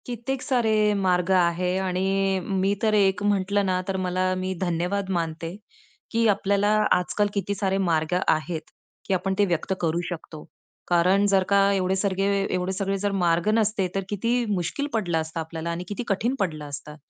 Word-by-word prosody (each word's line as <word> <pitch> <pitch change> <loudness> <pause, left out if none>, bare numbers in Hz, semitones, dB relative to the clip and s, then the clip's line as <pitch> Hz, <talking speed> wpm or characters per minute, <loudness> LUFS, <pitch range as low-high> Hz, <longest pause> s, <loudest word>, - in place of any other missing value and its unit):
कित्येक 245 +2 -4
सारे 220 -6 +2
मार्ग 180 -2 +1
आहे 180 0 +2
आणि 190 +1 0
अ, - - -3
मी 195 +1 0
तर 215 -1 +3
एक 195 -1 +3
म्हटलं 200 0 +1
ना 185 -1 0
तर 190 -1 -1
मला 185 0 0
मी 185 0 -2
धन्यवाद 180 +3 -1
मानते, 165 +1 -4 0.6
की 230 0 +2
आपल्याला 200 0 +2 0.2
आजकाल 205 +3 +2
किती 200 0 -2
सारे 195 -1 0
मार्ग 165 -3 0
आहेत, 155 +1 0 0.4
की 195 - -1
आपण 190 +1 0
ते 205 - +5
व्यक्त 175 +1 -1
करू 170 0 0
शकतो 160 -3 -8 0.4
कारण 180 +3 +3
जर 195 -1 +3
का 200 0 +4
एवढे 190 -1 +1
सगळे 195 0 0 0.3
एवढे 180 +1 -1
सगळे 195 0 -1
जर 205 +1 -1
मार्ग 170 +3 +2
नसते, 215 -3 +1
तर 195 - 0
किती 210 +4 -1 0.2
मुश्कील 195 - -2
पडलं 185 -7 0
असता 160 +1 -3
आपल्याला 160 +1 -5
आणि 170 +1 -4
किती 205 +5 -4
कठीण 225 +6 0
पडलं 155 -6 -2
असतं. 150 +1 -8
190 Hz, 175 wpm, -25 LUFS, 175-200 Hz, 0.6 s, ते